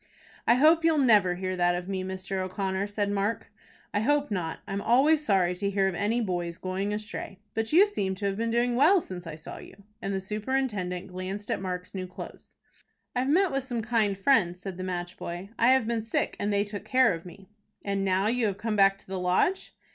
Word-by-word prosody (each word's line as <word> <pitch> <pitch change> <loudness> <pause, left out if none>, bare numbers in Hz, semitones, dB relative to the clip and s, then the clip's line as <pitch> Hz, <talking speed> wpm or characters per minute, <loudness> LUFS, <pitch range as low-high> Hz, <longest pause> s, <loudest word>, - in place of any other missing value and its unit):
"I 235 - +6
hope 315 +5 +5
you'll 325 -1 +4
never 210 -10 +4
hear 185 +1 -3
that 175 -1 +2
of 175 0 -5
me, 190 -1 -2
Mr. 190 +1 -4
O'Connor," 190 +1 -2
said 205 0 -1
Mark. 205 +3 -2 0.4
"I 205 - +2
hope 290 +3 +1
not. 175 -5 -2
I'm 195 0 -3
always 285 +8 +4
sorry 190 -8 +2
to 200 +1 -1
hear 195 -1 +2
of 190 - -1
any 210 +6 0
boy's 175 -4 -2
going 190 +2 -2
astray. 210 -2 -5 0.2
But 225 0 -2
you 360 +6 +7
seem 195 - -2
to 200 +2 -5
have 195 -1 0
been 230 +2 -1
doing 240 +1 +1
well 320 +10 +6
since 180 - -8
I 160 - -6
saw 155 - -9
you;" - - -12 0.3
and 195 - -3
the 195 - -1
superintendent 210 -3 -2
glanced 185 +3 -5
at - - -1
Mark's 180 -1 -5
new 185 -1 -4
clothes. 180 - -10 0.6
"I've 255 +2 0
met 365 +3 +3
with 275 -1 -1
some 240 -3 -3
kind 215 -4 +1
friends," 195 -6 +2
said 185 -1 -7
the 185 - -5
match 175 -1 -4
boy. 175 +4 -6
"I 230 - +5
have 260 -3 +2
been 230 0 -1
sick, 225 +1 -1
and 205 - 0
they 200 0 +2
took 205 -1 -6
care 255 -5 +4
of 165 0 -6
me." 185 +2 -13 0.4
"And 200 -1 -1
now 190 0 +1
you 230 +1 +1
have 195 -2 -2
come 220 0 -2
back 195 -1 +5
to - - -19
the 190 0 -4
Lodge." 180 - +1
200 Hz, 225 wpm, -28 LUFS, 185-235 Hz, 0.6 s, you